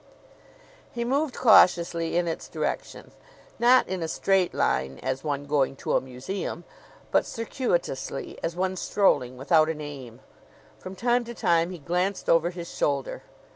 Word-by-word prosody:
He 235 0 -3
moved 275 +3 0
cautiously 170 -7 +4
in 175 -1 +1
its 165 - -4
direction - - -4 0.5
not 245 +2 +5
in 185 -1 -3
a 165 - -2
straight 190 +2 +1
line 65 0 0
as 130 +1 -2
one 145 -2 -2
going 140 -2 +1
to - - -2
a - - +3
museum, 135 +8 -5 0.5
but - - +4
circuitously 175 - -3
as 165 0 -3
one 185 +1 -1
strolling 130 -12 +1
without 155 +4 +3
an 160 -1 -3
aim. 135 -5 -9 0.6
From 185 +1 -8
time 240 +4 +1
to 235 +1 -8
time 170 -3 +2
he 185 - -7
glanced 180 +5 -2
over 165 +1 +4
his 175 -1 -8
shoulder. 140 -2 -1
170 Hz, 150 wpm, -26 LUFS, 145-195 Hz, 0.6 s, not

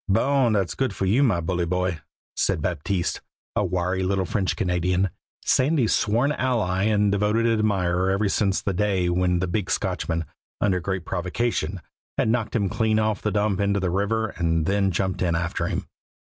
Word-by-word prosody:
"Bon! 125 +3 +3
Dat's 100 -4 0
good 130 -7 -1
for 95 - -1
you, 110 +9 +3
my 115 -11 +3
bully 85 +1 -1
boy," 90 -1 -1 0.4
said - - +1
Baptiste, 85 +2 -2 0.3
a - - +2
wiry 90 0 -1
little 95 0 0
French 95 +1 -1
Canadian, 90 +1 0 0.3
Sandy's 130 -3 +3
sworn 120 +7 +2
ally 110 -9 0
and 105 -2 +3
devoted 105 +3 +1
admirer 95 -5 +1
ever 100 +2 +1
since 100 0 +1
the 100 - -1
day 95 -2 +1
when 90 0 +2
the 95 - 0
big 90 +1 -2
Scotchman, 80 0 -1 0.3
under 95 -3 +2
great 95 0 -3
provocation, 90 -1 -2 0.4
had - - +2
knocked 115 -1 0
him 100 -4 +2
clean 110 +2 +1
off 110 -1 0
the 105 - 0
dump 105 -1 0
into 100 0 +1
the 95 -2 -1
river 105 +4 0
and 80 -3 0
then 100 +2 +2
jumped 95 +1 -1
in 85 -3 +1
for - - -2
him. - - -3
95 Hz, 175 wpm, -24 LUFS, 90-110 Hz, 0.4 s, Bon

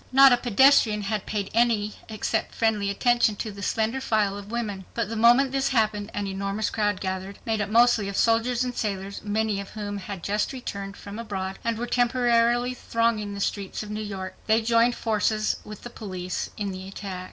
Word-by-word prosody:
Not 270 0 +8
a - - +4
pedestrian 240 -2 +4
had 205 0 -2
paid 205 -2 -3
any 220 -3 +2 0.2
except 220 0 -2
friendly 215 -3 +1
attention 240 +1 +2
to 215 +1 -4
the 200 0 -10
slender 225 +5 0
file 215 -5 +1
of 205 0 -9
women. 210 -5 -3
But 230 -3 -1
the 225 - -4
moment 240 +4 +5
this 270 0 +1
happened 215 -4 +1
an 205 - -2
enormous 195 +2 -2
crowd 205 -3 0
gathered, 190 +1 -4
made 220 -2 0
up 205 - -2
mostly 230 -2 +4
of 200 - -4
soldiers 235 +2 +2
and 250 -1 -3
sailors, 200 -2 -3
many 210 0 0
of 200 - -9
whom 205 -1 -5
had 195 -2 -7
just 210 +5 -1
returned 200 -6 -6
from 205 +2 -8
abroad 195 -4 -4
and 230 -1 -1
were 240 - -2
temporarily 240 0 +2
thronging 230 -4 -1
the - - -6
streets 200 +1 -2
of 210 - -8
New 210 +1 -3
York. 190 -3 -5
They 220 +1 +3
joined 235 +1 +3
forces 215 -1 0
with 210 -1 -10
the 240 - -8
police 185 -5 -5
in 205 -2 -2
the 190 0 -7
attack. 195 -1 -6
215 Hz, 195 wpm, -25 LUFS, 200-235 Hz, 0.2 s, Not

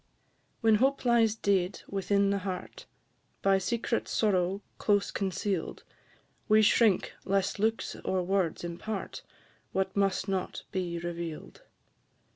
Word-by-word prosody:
When 225 -1 +5
hope 270 0 +2
lies 230 -3 +4
dead 195 -3 0
within 200 0 +1
the 200 - +1
heart, 185 -2 -6 0.6
By 195 -1 +4
secret 235 +3 -1
sorrow 195 -2 +1 0.2
close 205 -1 +2
conceal'd, 190 -2 -2 0.7
We 215 0 +6
shrink 215 -2 +3
lest 195 +1 0
looks 220 +2 0
or 185 -1 0
words 185 -3 0
impart 180 +4 -5 0.5
What 190 0 -1
must 195 -1 +1
not 190 -2 -2
be 180 -2 -2
reveal'd. 170 -2 -6
195 Hz, 115 wpm, -29 LUFS, 185-215 Hz, 0.7 s, We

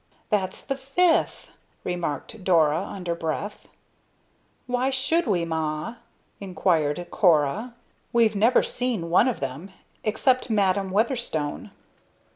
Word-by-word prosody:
"That's 195 -4 -1
the 275 -1 -2
fifth!" 315 +6 +1 0.3
remarked 175 - -4
Dora, 160 -4 +3
under 185 -3 -4
breath. 170 +5 -4 1.0
"Why 250 +1 0
should 270 +5 +1
we, 175 -5 +1
Ma?" 160 +6 -3 0.4
inquired 175 -4 0
Cora. 180 - +2 0.4
"We've 230 -2 +3
never 225 +5 +4
seen 230 -10 -2
one 185 - +5
of 250 - -2
them 135 +8 -5 0.3
except 250 +4 +1
Madam 195 -2 +1
Weatherstone!" 205 - -1
195 Hz, 105 wpm, -25 LUFS, 165-240 Hz, 1.0 s, one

